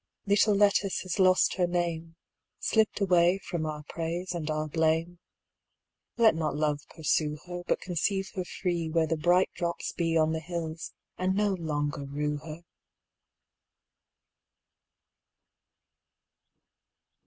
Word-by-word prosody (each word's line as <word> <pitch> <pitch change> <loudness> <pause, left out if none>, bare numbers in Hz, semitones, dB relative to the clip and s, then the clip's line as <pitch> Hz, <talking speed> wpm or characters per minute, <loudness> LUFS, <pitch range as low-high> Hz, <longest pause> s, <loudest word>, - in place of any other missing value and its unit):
Little 205 +1 +4
Lettice 200 -1 +3
has 185 +1 -4
lost 185 0 +4
her 180 -2 +2
name, 170 -2 -2 0.4
Slipt 220 -2 +1
away 180 -1 +4
from 175 -4 -4
our 150 -1 -5
praise 170 +4 -4
and 160 -3 -4
our 155 0 -1
blame; 165 +2 0 1.0
Let 230 -4 +6
not 155 -2 -2
love 150 -1 0
pursue 155 -1 0
her, 175 0 -6
But - - 0
conceive 190 +2 -1
her 185 - -2
freeWhere 170 -3 -1
the 165 - 0
bright 175 +4 +3
drops 170 -1 -3
beOn 165 -2 +1
the 160 - -1
hills, 165 -1 -5 0.3
and 185 +1 +1
no 205 -1 +2
longer 150 -4 -2
rue 150 +1 -2
her! 155 +3 -9
170 Hz, 120 wpm, -28 LUFS, 155-185 Hz, 1.0 s, Let